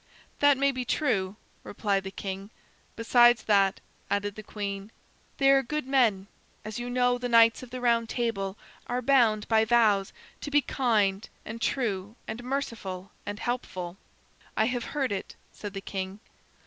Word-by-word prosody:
"That 285 -1 +5
may 275 +1 +3
be 255 -1 -3
true," 215 -7 0 0.3
replied 200 -2 -1
the - - -3
king. 195 0 -6 0.5
"Besides 240 0 +5
that," 195 -2 +3 0.3
added 205 0 0
the 215 - -8
queen, 200 -1 -5 0.5
"they 275 -1 +5
are 275 0 +5
good 300 +2 -3
men. 235 -8 +2 0.4
As 215 +1 -5
you 240 0 -4
know, 245 0 +2
the 245 0 -3
Knights 230 0 +6
of 255 - -10
the 255 +1 -6
Round 235 -2 +2
Table 205 -5 -2 0.3
are 250 +1 -2
bound 230 -6 +3
by 220 -1 +4
vows 220 -4 +3 0.3
to - - -4
be 290 0 +4
kind 215 -7 +1 0.2
and 225 +1 -7
true 210 -6 -1
and 235 +2 -5
merciful 225 -8 -4 0.2
and 205 0 -4
helpful." 185 -8 -4 0.6
"I 220 - +4
have 245 0 -1
heard 275 -6 -2
it," 195 - -4 0.2
said 205 -1 -8
the 195 - -4
king. 190 0 -5
225 Hz, 160 wpm, -28 LUFS, 200-245 Hz, 0.6 s, Knights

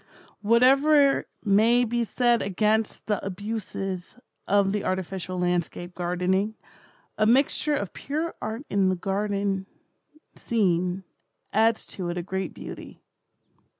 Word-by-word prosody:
Whatever 275 +6 +4 0.2
may 225 +5 +4
be 240 0 0
said 240 0 +2
against 215 +3 0
the 210 -2 -1
abuses 195 -1 -5 0.3
of 200 -1 +3
the 210 0 -1
artificial 185 0 -3
landscape 175 0 -1
gardening, 180 +4 0 0.6
a 215 - +4
mixture 275 +4 +3
of 200 - -4
pure 315 +4 -3
art 225 +6 -4
in 195 -2 +2
a - - 0
garden 195 0 -1 0.7
scene, 185 -4 0 0.5
adds 225 +1 +3
to 180 -3 -5
it 175 - -3
a 175 - -2
great 190 0 -3
beauty. - - -10
200 Hz, 115 wpm, -26 LUFS, 185-230 Hz, 0.7 s, Whatever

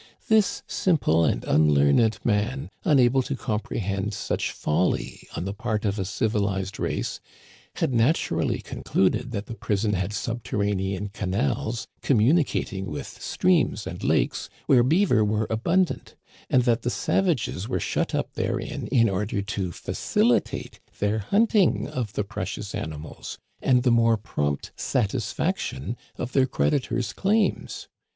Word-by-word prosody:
This 220 -2 +3
sim 180 -4 +1
ple 80 - +3
and - - 0
unlearned 75 +8 +4
man, 120 +5 0
unable 130 -3 +4
to 135 +2 -3
comprehend 105 -4 -2
such - - -2
folly 80 +4 -1
on 85 - -3
the 100 - -3
part 110 0 -2
of 100 0 0
a 95 - -1
civilized 100 -1 -1
race, - - -2 0.6
had 130 - 0
naturally 120 +8 +1
con - - -8
cluded 110 +6 +1
that 105 -3 -4
the - - -7
prison 105 -1 -1
had 95 0 -1
subterranean 100 -3 -2
canals 110 +5 -1 0.2
commu 125 +1 +4
nicating 115 - 0
with 75 - -7
streams - - +1
and - - -6
lakes - - +1 0.2
where 125 -3 +5
beaver 155 - +3
were 105 +1 +1
abundant, 170 +12 0 0.3
and 125 - +4
that 120 -1 +2
the 120 - -1
savages 125 - 0
were - - 0
shut - - -1
up - - -2
therein - - -3
in 115 -2 +4
order 100 +1 -1
to 95 -3 -3
facilitate - - 0 0.2
their 105 +2 0
hunting 205 - +2
of 115 -5 -4
the 105 - 0
precious 100 - -5
animals, 80 0 -6 0.2
and 125 -2 +3
the 125 - +4
more 115 -1 +4
prompt 75 -9 -2
satisfaction 125 - -1 0.2
of 125 - -4
their 130 -1 +3
creditors' 125 -4 0
claims. 210 +2 0
110 Hz, 140 wpm, -25 LUFS, 100-130 Hz, 0.6 s, where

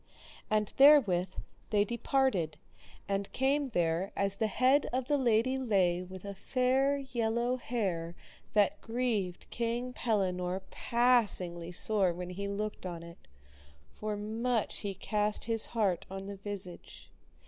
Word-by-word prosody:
And 215 -1 +1
therewith 225 -11 +6 0.4
they 205 -1 +3
departed, 235 - 0 0.5
and 200 0 -2
came 275 +1 +1
there 175 -2 0
as 200 0 0
the 220 - +1
head 260 +7 +3
of 255 0 -1
the 290 - +1
lady 245 +1 +2
lay 190 -8 +2
with 185 +1 -9
a 200 - -5
fair 260 +6 +1
yellow 240 -2 -1
hair 185 -9 -2 0.4
that 205 -2 +3
grieved 225 -7 -2
King 240 +2 -2
Pellinore 190 -5 -1
passingly 205 -8 +2
sore 190 0 +2
when 180 +1 -6
he 200 +2 -4
looked 205 -1 -4
on 170 -2 -6
it, 170 0 -13 0.7
for 210 -1 -4
much 225 +2 -1
he 200 -2 -4
cast 210 +2 -1
his 225 -1 0
heart 205 -6 0
on 195 0 -6
the 200 0 -7
visage. 185 - -7
210 Hz, 135 wpm, -31 LUFS, 185-245 Hz, 0.7 s, therewith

